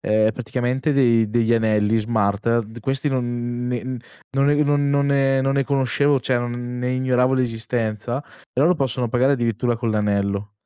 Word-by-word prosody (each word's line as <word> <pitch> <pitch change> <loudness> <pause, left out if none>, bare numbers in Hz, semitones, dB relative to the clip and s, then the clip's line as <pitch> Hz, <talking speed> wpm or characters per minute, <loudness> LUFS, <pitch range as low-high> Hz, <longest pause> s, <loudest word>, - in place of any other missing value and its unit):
ehm, 110 +1 +2
praticamente 125 +5 -2
dei 120 -5 +3
degli 115 0 +2
anelli 110 -1 +2
smart, 110 +1 0
d 110 +3 -11
questi 135 +4 -1
non 120 -2 -2
ne 125 -2 -2 0.5
non 135 0 +3
ne 145 - +4
non 145 0 +1
non 140 0 +2
ne 135 -1 +2
non 135 +1 0
ne 140 -1 +1
conoscevo, 140 +1 +1
cioè 125 0 0
non 120 0 -4
ne 125 0 -2
ignoravo 130 0 +1
l'esistenza, 115 -1 -2
però 145 -1 -3
loro 180 - +4
possono 130 -5 -1
pagare 125 +4 +2
addirittura 120 -1 -1
con 115 -1 -2
l'anello. 100 -1 -1
120 Hz, 170 wpm, -21 LUFS, 115-135 Hz, 0.5 s, ne